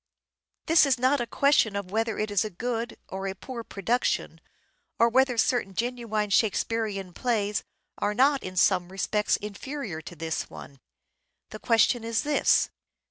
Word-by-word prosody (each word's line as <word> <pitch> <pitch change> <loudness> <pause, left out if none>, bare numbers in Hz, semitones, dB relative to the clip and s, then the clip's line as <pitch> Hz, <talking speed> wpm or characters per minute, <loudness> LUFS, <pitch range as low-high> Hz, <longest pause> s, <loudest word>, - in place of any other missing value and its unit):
This 320 -2 +5
is 265 -2 +2
not 260 +2 +2
a 240 - -3
question 275 -7 +3
of 200 -2 -4
whether 225 +1 -1
it 215 0 -2
is 205 - +2
a 215 - -4
good 230 +4 -4
or 195 +1 -5
a 190 - -4
poor 235 +4 -7
production, 225 +4 -1 0.6
or 230 - +5
whether 255 0 +3
certain 225 -5 +1
genuine 230 -3 -2
Shake 215 0 +3
spearean 205 -5 -2
plays 210 -3 -1 0.4
are 210 0 0
not 275 +3 +4
in 185 0 -7
some 180 -1 +3
respects 210 +2 0
inferior 210 - -6
to 175 - -10
this 160 0 -3
one. 140 -1 -11 0.7
The 215 - -8
question 230 +1 +3
is 225 -1 -1
this. 295 0 +3
220 Hz, 160 wpm, -27 LUFS, 195-245 Hz, 0.7 s, This